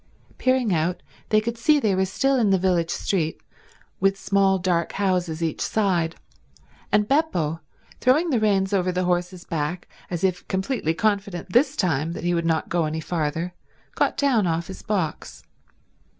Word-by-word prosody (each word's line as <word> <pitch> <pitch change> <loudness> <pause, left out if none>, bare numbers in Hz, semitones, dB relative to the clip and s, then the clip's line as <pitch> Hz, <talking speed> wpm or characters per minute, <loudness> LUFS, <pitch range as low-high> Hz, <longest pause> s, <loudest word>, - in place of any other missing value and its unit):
Peering 255 -5 +2
out 170 +2 -1 0.3
they 215 - +4
could 230 +2 -4
see 300 +4 +4
they 215 -7 +1
were 190 0 +2
still 270 +7 +1
in 220 -4 +3
the 195 - +4
village 175 -3 +1
street, 165 -4 -1 0.6
with 195 +1 +2
small 195 -1 +2
dark 175 -2 0
houses 180 -4 0
each 160 -2 -2
side; 175 -6 0 0.8
and 210 0 +3
Beppo, 175 - +1 0.4
throwing 305 +7 +3
the 245 - +2
reins 200 -2 +1
over 185 -2 +2
the 180 +1 -1
horse's 180 0 -1
back 165 +3 -3 0.2
as 175 -1 -4
if 185 -2 0
completely 190 - -1
confident 200 -3 -1
this 270 +4 +4
time 165 - 0
that - - -7
he 175 0 +1
would 170 -1 0
not 160 -1 +1
go 170 -2 0
any 155 +1 -2
farther, 165 +1 -2 0.4
got - - 0
down 245 -9 +2
off 165 0 -1
his 190 - -9
box. 185 -8 -3
185 Hz, 165 wpm, -24 LUFS, 170-210 Hz, 0.8 s, they